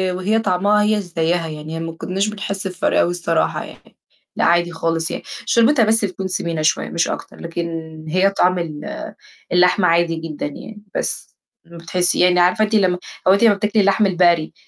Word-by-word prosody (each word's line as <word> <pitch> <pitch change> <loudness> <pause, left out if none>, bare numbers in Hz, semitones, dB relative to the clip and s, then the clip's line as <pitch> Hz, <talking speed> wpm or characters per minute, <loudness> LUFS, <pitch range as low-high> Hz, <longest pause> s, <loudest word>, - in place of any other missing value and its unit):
وهي 205 +5 0
طعمها 205 +1 +2
هي 210 0 +1
زيّها 170 -2 -1
يعني 155 +1 -7
ما 165 0 -4
كنّاش 190 +5 -2
بنحس 200 -2 -4
بفَرق 180 -2 0
أوي 175 - +2
الصراحة، 170 -2 -1
يعني، - - -16 0.4
لأ - - 0
عادي 175 +1 +2
خالص 165 0 -1
يعني - - -5 0.2
شوربتها 235 0 +4
بس 220 0 +3
بتكون 190 0 -5
سِمينة 170 -3 -2
شوية 155 +1 +1
مش 170 - 0
أكتر، - - -6
لكن 170 0 -4 0.4
هي 185 +4 +3
طعم 185 -2 +1
ال 155 -3 -6 0.7
اللحمة 180 +1 +4
عادي 170 0 +2
جدًا 160 -2 -5
يعني، 210 +8 -9
بس - - -3 0.3
ما 170 0 -13
بتحسّي 175 +2 +1
يعني 180 0 +4
عارفة 180 +5 +3
أنتِ 215 - -1
لمّا 185 -4 +2 0.3
هو 190 - +7
أنتِ 200 - +2
لمّا 225 -3 +6
بتاكلي 210 +1 0
اللحم 200 +2 +3
البقري 175 -4 +2
180 Hz, 180 wpm, -19 LUFS, 165-200 Hz, 0.7 s, هو